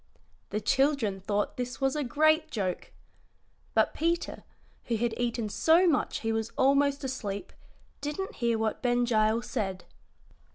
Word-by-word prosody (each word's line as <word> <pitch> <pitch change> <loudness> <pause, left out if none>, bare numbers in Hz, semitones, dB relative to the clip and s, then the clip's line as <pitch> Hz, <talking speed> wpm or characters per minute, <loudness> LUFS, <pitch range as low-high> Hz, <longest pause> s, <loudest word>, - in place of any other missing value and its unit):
The 210 - -1
children 270 -6 +1
thought 205 +2 -1
this 245 0 -4
was 270 0 +1
a 300 - 0
great 310 +5 +3
joke. 190 -8 -3 0.8
But - - +3
Peter, 335 +1 -1 0.4
who 235 - 0
had 235 +1 0
eaten 235 -2 -1
so 325 - +4
much 315 -7 +1
he 225 - -1
was 225 0 -2
almost 280 +1 +3
asleep, 210 -7 -4 0.5
didn't 300 +7 -4
hear 235 -1 +1
what 220 -1 -1
Ben 245 -1 +2
Gile 220 -1 +2
said. 190 -7 -3
245 Hz, 140 wpm, -29 LUFS, 220-285 Hz, 0.8 s, so